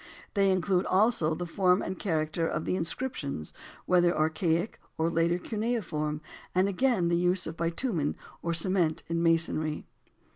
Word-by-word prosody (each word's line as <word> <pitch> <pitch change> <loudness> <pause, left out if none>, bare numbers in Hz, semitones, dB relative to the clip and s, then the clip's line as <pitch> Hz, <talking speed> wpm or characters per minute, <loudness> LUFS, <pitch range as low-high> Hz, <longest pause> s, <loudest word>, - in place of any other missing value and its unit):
They 195 -2 +3
include 185 0 +1
also 185 -6 +3
the 175 - -4
form 180 +2 +2
and 185 - -4
character 160 -2 0
of 155 - -2
the - - 0
inscriptions, 165 - -3 0.3
whether 175 -1 +3
archaic 165 +4 0 0.2
or 165 +1 +1
later 165 +1 +2
cuneiform, 180 -9 -2 0.3
and 185 +1 +4
again 200 -3 +1
the 170 - +2
use 180 +1 +2
of 160 - -5
bitumen 170 - -1 0.3
or 170 - -1
cement 170 -1 +1
in 165 0 0
masonry. 165 -2 +1
170 Hz, 145 wpm, -29 LUFS, 160-190 Hz, 0.3 s, and